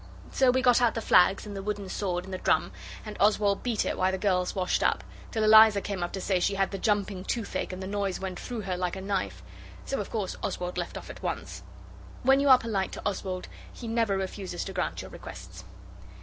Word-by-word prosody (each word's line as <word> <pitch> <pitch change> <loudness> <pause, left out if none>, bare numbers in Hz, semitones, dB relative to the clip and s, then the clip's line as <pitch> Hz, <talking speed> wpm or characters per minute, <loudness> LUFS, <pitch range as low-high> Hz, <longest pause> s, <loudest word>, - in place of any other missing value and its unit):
So 265 -1 +3
we 260 +1 +2
got 245 -1 +5
out 235 -2 +3
the - - 0
flags 195 -2 +4
and 205 -1 -7
the 195 - -4
wooden 205 -1 -3
sword 180 -2 -2
and 190 - -8
the 185 - -3
drum, - - +2 0.3
and 215 - -7
Oswald 205 -1 +3
beat 235 -4 0
it - - -2
while 185 0 +3
the 190 - -1
girls 180 -2 0
washed 185 -2 0
up, - - +1 0.3
till 220 -2 -1
Eliza 215 -1 +8
came 195 -2 -4
up 175 - -2
to 195 - -3
say 190 -1 +1
she 195 +3 +1
had 195 0 +1
the 195 - -4
jumping 200 -3 0
toothache, 225 -1 -3
and 185 +1 -6
the - - -4
noise 200 -1 -2
went 190 -2 -5
through 240 -3 -5
her 190 -2 -3
like 180 0 -2
a - - -5
knife. 195 -1 -2 0.4
So 275 - -2
of 200 - -6
course 205 -5 -3
Oswald 180 0 -3
left - - -4
off - - -8
at - - -12
once. - - -4 0.6
When 270 +2 +5
you 280 0 +3
are 260 - +10
polite 215 -5 -2
to - - -6
Oswald 185 -2 -3 0.2
he 235 - -9
never 225 -3 +1
refuses 190 0 -4
to - - -6
grant - - -2
your - - -10
requests. 90 0 -10
200 Hz, 235 wpm, -28 LUFS, 185-220 Hz, 0.6 s, are